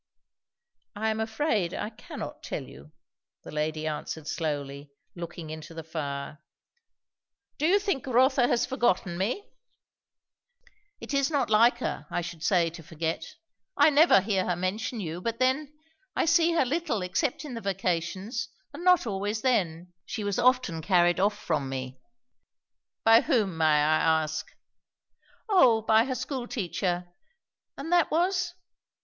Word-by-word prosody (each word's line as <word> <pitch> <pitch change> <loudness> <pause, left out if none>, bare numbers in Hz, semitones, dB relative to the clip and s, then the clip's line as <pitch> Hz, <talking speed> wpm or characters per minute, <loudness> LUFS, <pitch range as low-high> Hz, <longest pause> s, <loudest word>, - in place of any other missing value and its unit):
"I 220 +2 -1
am 220 - -3
afraid 220 - 0
I 210 - -4
cannot 215 - -8
tell - - -4
you," 70 +3 -14 0.5
the - - -9
lady 155 +1 -2
answered 155 0 -4
slowly, 145 -3 -3 0.2
looking 170 -2 -7
into 155 +1 -9
the 165 - -6
fire. 150 -2 -5 1.2
"Do 310 - +2
you 385 +4 +5
think 390 - -2
Rotha 255 0 +4
has 235 - +2
forgotten 190 -8 0
me?" 215 - -2 1.5
"It - - -7
is 275 0 +2
not 285 -7 0
like 230 +3 +5
her, 150 - -4
I - - -1
should 170 -1 -7
say, 175 -4 +2
to 170 0 -10
forget. 160 +1 -4 0.4
I 295 +2 +6
never 295 - +6
hear 195 -1 0
her 180 - +1
mention 200 +6 -2
you. 170 -2 -5
But 230 +3 -2
then, 260 +4 +1 0.4
I - - +2
see 335 +1 +4
her 325 - +3
little 275 - -1
except 245 - -1
in 280 - -6
the 230 - -5
vacations, 190 +2 -2 0.2
and 300 +5 -8
not 360 -4 +5
always 205 +1 -2
then; 180 -8 0
she 215 - -5
was 205 +2 -1
often 250 -10 +2
carried 175 -1 +3
off 205 +2 +2
from 150 -9 -2
me." 130 -1 -5 1.1
"By 225 +1 +7
whom, 220 - +1
may 160 -1 +1 0.2
I 155 +1 +3
ask?" 155 0 -4 1.0
"O 255 - +5
by 220 +1 +4
her 260 -1 -2
school 255 0 -4
teacher." 180 -4 -2 0.7
"And 290 +5 -6
that 350 -3 +4
was 355 +1 0
205 Hz, 150 wpm, -27 LUFS, 165-260 Hz, 1.5 s, By